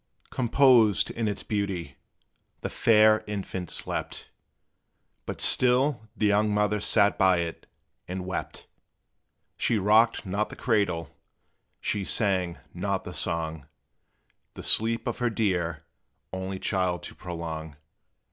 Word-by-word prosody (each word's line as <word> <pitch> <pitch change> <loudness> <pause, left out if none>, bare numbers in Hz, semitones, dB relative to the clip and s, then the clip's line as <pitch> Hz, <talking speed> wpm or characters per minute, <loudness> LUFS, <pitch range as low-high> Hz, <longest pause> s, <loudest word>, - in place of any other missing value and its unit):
Composed 120 -4 +4
in 115 -1 -2
its 105 - -3
beauty, 95 -9 -3 0.6
the - - -4
fair 110 -1 +4
infant 95 -3 -5
slept; - - -4 1.0
But - - -5
still 125 -2 +2
the 105 - +1
young 105 +1 +3
mother 105 0 +1
sat 100 0 +3
by 95 -1 +5
it 85 -1 -6 0.4
and 90 0 -5
wept: 95 - -5 0.9
She 115 - +1
rocked 110 +4 +3
not 100 +3 -1
the - - -9
cradle, 100 -8 -1 0.6
she 100 - -2
sang 95 -4 +1 0.2
not 95 +2 -2
the 90 - -8
song, 80 -5 -3 0.9
The - - -8
sleep 115 +1 +2
of - - -3
her 120 -1 +1
dear, 90 -8 -1 0.5
only 95 +1 -4
child 90 -2 -1
to - - -8
prolong. 80 -3 -6
100 Hz, 120 wpm, -27 LUFS, 90-110 Hz, 1.0 s, by